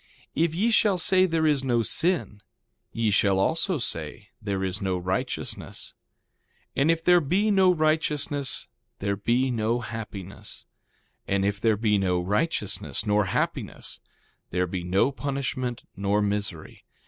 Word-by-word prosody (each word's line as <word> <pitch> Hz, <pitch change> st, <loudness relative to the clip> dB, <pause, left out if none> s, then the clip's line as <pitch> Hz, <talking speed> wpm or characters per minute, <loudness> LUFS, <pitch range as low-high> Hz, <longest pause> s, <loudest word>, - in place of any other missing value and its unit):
If 165 Hz, +1 st, +1 dB
ye 220 Hz, +7 st, +2 dB
shall 210 Hz, -3 st, +4 dB
say 185 Hz, +2 st, +4 dB
there 165 Hz, -2 st, +1 dB
is 145 Hz, -3 st, +3 dB
no 120 Hz, -3 st, +2 dB
sin, 165 Hz, -, 0 dB, 0.5 s
ye 115 Hz, -2 st, 0 dB
shall 100 Hz, -1 st, +3 dB
also 165 Hz, -, +1 dB
say 100 Hz, -, -4 dB
there 100 Hz, -3 st, -2 dB
is 95 Hz, 0 st, -3 dB
no 95 Hz, -2 st, 0 dB
righteousness. 90 Hz, +1 st, -3 dB, 0.8 s
And 140 Hz, +4 st, +3 dB
if 165 Hz, 0 st, +2 dB
there 175 Hz, 0 st, +6 dB
be 190 Hz, +9 st, +2 dB
no 190 Hz, -2 st, +5 dB
righteousness 155 Hz, -3 st, +1 dB, 0.3 s
there 100 Hz, -1 st, -1 dB
be 120 Hz, +6 st, +1 dB
no 115 Hz, +1 st, 0 dB
happiness. 105 Hz, -5 st, -7 dB, 0.6 s
And 100 Hz, 0 st, +1 dB
if 100 Hz, 0 st, -1 dB
there 110 Hz, -2 st, +3 dB
be 105 Hz, -1 st, +2 dB
no 90 Hz, -2 st, +1 dB
righteousness 105 Hz, -, -1 dB
nor 105 Hz, -1 st, +3 dB
happiness 95 Hz, -, -3 dB, 0.5 s
there 90 Hz, +1 st, 0 dB
be 90 Hz, 0 st, -4 dB
no 95 Hz, +9 st, +2 dB
punishment 135 Hz, -3 st, -3 dB
nor 100 Hz, +1 st, +1 dB
misery. 100 Hz, -5 st, -3 dB
115 Hz, 140 wpm, -26 LUFS, 100-155 Hz, 0.8 s, there